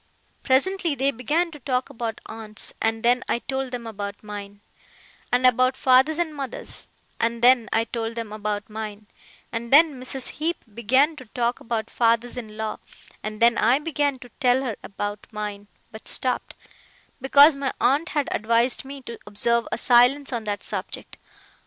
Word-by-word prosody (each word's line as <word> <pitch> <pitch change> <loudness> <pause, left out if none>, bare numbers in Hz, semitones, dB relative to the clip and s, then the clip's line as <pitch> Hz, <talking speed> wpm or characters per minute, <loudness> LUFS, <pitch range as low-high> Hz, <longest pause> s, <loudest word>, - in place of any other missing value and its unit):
Presently 335 +4 +2
they 275 +1 +1
began 300 +8 0
to 300 - -11
talk 255 -1 -2
about 225 -1 -5
aunts, 220 -1 -4
and 225 0 0
then 245 +1 +3
I - - +2
told 265 +1 -3
them 245 -2 -6
about 205 -2 -6
mine; 205 -1 -8 0.7
and 250 +1 +3
about 255 +1 +4
fathers 265 +4 +4
and 340 -3 -1
mothers, 275 -4 -7 0.3
and 230 +1 -1
then 245 -2 +5
I 225 - +2
told 230 0 -4
them 225 -2 -5
about 210 -1 -3
mine; 215 -1 -7 0.5
and 235 0 -5
then 290 -2 +6
Mrs. 255 0 -3
Heep 330 +3 -2
began 260 +8 +3
to 260 - -10
talk 240 +1 -1
about 225 -1 -3
fathers 235 0 +1
in 215 -4 -8
law, 220 -1 -3 0.4
and 215 0 -6
then 235 0 +4
I 240 +4 +4
began 290 -2 0
to - - -14
tell 255 0 +3
her 235 -5 -3
about 205 0 -5
mine 210 -1 -5 0.2
but 220 0 -11
stopped, 255 -1 -1 0.7
because 285 +3 +7
my 275 -1 -2
aunt 290 +7 +2
had 295 -2 -1
advised 230 +3 +1
me 275 0 -9
to 235 -1 -8
observe 235 +3 +2
a - - -1
silence 250 +4 +4
on 230 -2 -3
that 205 -1 -3
subject. - - -5
240 Hz, 170 wpm, -24 LUFS, 220-270 Hz, 0.7 s, because